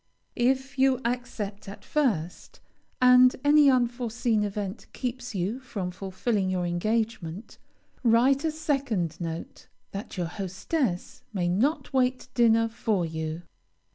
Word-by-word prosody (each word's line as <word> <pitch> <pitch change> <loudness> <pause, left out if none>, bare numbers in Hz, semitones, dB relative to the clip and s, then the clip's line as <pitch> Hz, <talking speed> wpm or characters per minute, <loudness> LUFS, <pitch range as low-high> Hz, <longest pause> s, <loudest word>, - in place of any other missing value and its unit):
If 265 +2 0
you 265 -1 +4
accept 230 -5 -3
at 200 - -11
first, 205 - -1 0.4
and 250 0 +7
any 290 0 +6
unforeseen 240 -3 +1
event 200 0 -4
keeps 245 -2 -4
you 195 +7 -1
from 210 -8 -5
fulfilling 190 +2 -1
your 180 -1 0
engagement, 205 0 -2 0.4
write 250 +5 +4
a 320 - +2
second 270 - -1
note, 165 0 -6 0.2
that 200 0 -7
your 175 - 0
hostess 190 - -3
may 180 -3 0
not 270 - 0
wait 255 -1 +1
dinner 230 -1 +4
for 220 -5 -1
you. 160 +1 -4
225 Hz, 120 wpm, -27 LUFS, 185-255 Hz, 0.4 s, and